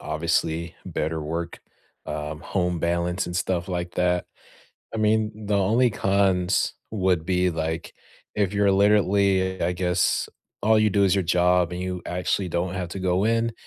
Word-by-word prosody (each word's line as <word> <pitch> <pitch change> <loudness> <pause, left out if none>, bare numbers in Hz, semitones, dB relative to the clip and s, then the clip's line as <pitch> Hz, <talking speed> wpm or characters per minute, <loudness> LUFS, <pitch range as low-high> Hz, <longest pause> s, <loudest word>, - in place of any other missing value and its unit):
obviously, 80 +1 -1
better 80 0 -3
work, 85 +3 -4 0.5
um, 75 0 -5
home 90 -1 -1
balance, 85 +2 0
and 90 - -4
stuff 90 -1 -1
like 90 -1 -3
that. 90 0 +1 0.7
I - - -2
mean, 110 0 0
the 100 -1 +1
only 110 +6 +3
cons 95 -2 +1 0.2
would 95 -6 +1
be, 90 0 +1
like, 80 0 -4 0.4
if 100 -3 0
you're 100 -1 +3
literally 100 -1 +2
I 85 - +1
guess, 90 0 0 0.3
all 110 +1 +4
you 110 0 +3
do 100 +1 +3
is 95 - +3
your 100 - +1
job 90 0 +3
and 90 - -4
you 90 -1 -4
actually 90 +1 -1
don't 85 +2 -2
have 90 -2 -3
to 95 - -5
go 95 0 +1
in, 115 +1 +1
90 Hz, 160 wpm, -24 LUFS, 85-100 Hz, 0.7 s, all